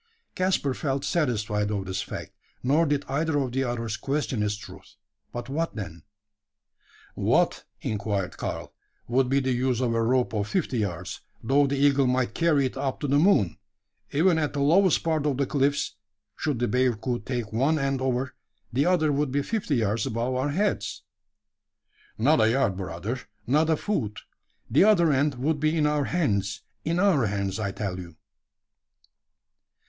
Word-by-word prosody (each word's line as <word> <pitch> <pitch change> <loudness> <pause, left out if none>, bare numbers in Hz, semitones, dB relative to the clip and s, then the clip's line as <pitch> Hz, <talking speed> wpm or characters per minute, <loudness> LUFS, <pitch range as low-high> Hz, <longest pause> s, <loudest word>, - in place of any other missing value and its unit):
Caspar 185 -7 +1
felt 135 0 -2
satisfied 105 -9 0
of 100 -2 -2
this 95 0 -2
fact; - - -6 0.3
nor 150 +6 +3
did 145 0 0
either 150 +2 0
of 135 -3 0
the 135 +2 0
others 115 -3 -2
question 135 -5 -1
its 105 0 0
truth 100 -1 -12 0.4
but 120 0 -5
what 160 +5 -2
then? 85 -6 -6 1.1
"What," - - +1 0.2
inquired 100 -3 -2
Karl, - - -5 0.3
"would 125 +1 +2
be 135 +1 +3
the 130 -1 0
use 125 -1 +1
of 125 -3 +1
a 115 - +1
rope 125 +1 +1
of 105 -1 -1
fifty 135 - -1
yards, 90 -4 -3 0.2
though 140 +1 +3
the 140 +1 -1
eagle 140 -1 +4
might 125 0 +1
carry 155 -5 +3
it 130 - -3
up 135 -1 -2
to 145 - -1
the 140 +1 +3
moon? 150 - +3 0.5
Even 165 +3 +3
at 150 -2 -1
the 145 - -2
lowest 170 +6 +4
part 160 -3 +1
of 140 -3 0
the 140 - +1
cliffs 140 +1 0 0.4
should 150 -5 -1
the 120 +1 0
bearcoot 125 -2 0
take 120 -5 -3
one 140 +8 +2
end 135 -2 -1
over, 130 0 -1 0.4
the 140 +6 +2
other 165 -4 +3
would 145 -1 0
be 140 +1 0
fifty 200 -6 -1
yards 110 -2 0
above 115 +3 -1
our 130 +3 0
heads?" 145 - -1 1.1
"Not 135 +3 +4
a 110 - +5
yard, 120 -5 +2
brother 95 +6 -4 0.3
not 150 +6 +2
a 160 - +3
foot. 120 - -2 0.5
The 140 +10 +4
other 180 -7 +5
end 140 +1 +2
would 145 +5 0
be 155 +2 +1
in 150 - +3
our 150 -1 +1
hands 105 - 0 0.2
in 165 +2 0
our 180 - +3
hands, 100 +1 -2
I 100 -2 -1
tell 95 -2 -4
you." 85 -3 -9
130 Hz, 175 wpm, -26 LUFS, 110-150 Hz, 1.1 s, a